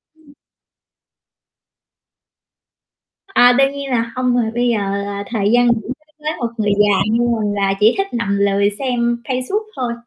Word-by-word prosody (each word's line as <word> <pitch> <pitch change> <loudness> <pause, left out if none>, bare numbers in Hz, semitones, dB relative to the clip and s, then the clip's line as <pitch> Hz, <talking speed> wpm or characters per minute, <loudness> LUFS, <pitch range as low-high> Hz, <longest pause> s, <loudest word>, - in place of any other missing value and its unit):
Ừm. 305 -3 -22 3.0
À, 245 0 +6
đương 275 0 +3
nhiên 280 -1 -6
là 230 -1 -1
hông 250 -1 0
rồi, 230 -2 0
bây 245 +1 0
giờ 235 -2 +1 0.3
là 200 0 -5
thời 210 -3 0
gian 245 0 +4
nghỉ 230 -2 +2
đối 305 +4 -9
với 305 +1 -2
một 240 - -1
người 210 -2 0
già 205 -2 +4
như 230 - +1 0.2
mình 205 -1 -1
là 195 -1 0
chỉ 215 +3 +5
thích 390 0 0
nằm 205 -4 -1
lười 200 0 +2
xem 240 -2 -1
Facebook 260 - -2
thôi. 245 -2 -2
235 Hz, 165 wpm, -18 LUFS, 210-255 Hz, 3.0 s, À